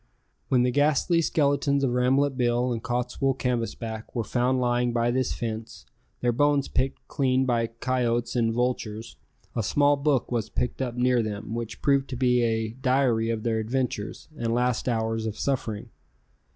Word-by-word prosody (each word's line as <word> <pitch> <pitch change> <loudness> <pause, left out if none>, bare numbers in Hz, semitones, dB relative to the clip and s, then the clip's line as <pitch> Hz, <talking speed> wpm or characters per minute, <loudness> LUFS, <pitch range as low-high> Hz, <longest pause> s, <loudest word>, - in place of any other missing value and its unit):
When 125 -2 +3
the 125 - +2
ghastly 150 +5 +3
skeletons 140 -2 +1
of 130 - +2
Rambolet 130 +3 +2
Bill 120 0 +1
and 115 - -4
Cottswool 125 +2 -1
Canvasback 115 -3 -3
were 115 - 0
found 125 +3 +1
lying 120 -1 +1
by 120 0 +1
this 130 +1 0
fence, 110 -1 -5 0.4
their 120 - +2
bones 145 +2 +2
picked 135 +1 -2
clean 130 -2 +1
by 120 -2 +1
coyotes 120 0 -1
and 115 -2 +2
vultures, 115 -2 -2 0.4
a 115 - +1
small 145 +7 +3
book 140 -3 +1
was 115 -4 -1
picked 125 +2 -2
up 125 -2 -2
near 125 0 +3
them 110 0 -4
which 115 -1 -5
proved 140 -2 +2
to 130 - -4
be 125 -1 +3
a 110 -1 0
diary 125 -2 +1
of 115 -2 -2
their 115 -1 0
adventures 110 -2 -3
and 115 0 0
last 125 0 0
hours 110 -1 -1
of 110 - -4
suffering. 115 -6 -2
125 Hz, 165 wpm, -26 LUFS, 115-130 Hz, 0.4 s, When